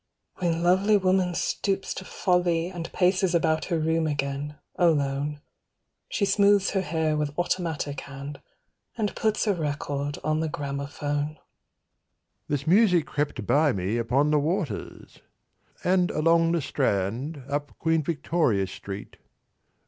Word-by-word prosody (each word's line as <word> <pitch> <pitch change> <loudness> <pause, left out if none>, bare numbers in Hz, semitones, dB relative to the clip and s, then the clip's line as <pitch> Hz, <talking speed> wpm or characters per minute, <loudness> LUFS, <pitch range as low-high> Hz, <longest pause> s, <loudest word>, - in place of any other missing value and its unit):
When 170 -2 0
lovely 190 +4 +4
woman 185 -2 +2
stoops 195 +2 -1
to 190 - -7
folly 175 -3 +1
and 175 -3 -6
Paces 185 -1 +2
about 160 -2 +2
her 170 - 0
room 160 0 +1
again, 145 0 -2 0.2
alone, 145 -3 +1 0.7
She 200 - +1
smooths 200 0 +4
her 195 - +1
hair 160 -2 0
with 150 -1 -2
automatic 165 -5 -1
hand, 140 +1 -8 0.6
And 210 -3 -1
puts 220 0 +1
a 205 - +3
record 145 -3 -3
on 155 +1 +1
the 160 0 -1
gramophone. 145 +1 -3 1.1
"This 145 -1 -2
music 180 -2 +4
crept 145 -7 -2
by 145 +2 +3
me 95 +4 -1
upon 135 +6 +2
the 150 - +4
waters" 155 - -3 0.6
And 180 -1 +3
along 165 +1 +3
the 170 - +1
Strand, 130 - -1
up 145 +1 -3
Queen 160 -1 +2
Victoria 150 - +1
Street. 100 +1 -8
155 Hz, 130 wpm, -26 LUFS, 145-180 Hz, 1.1 s, lovely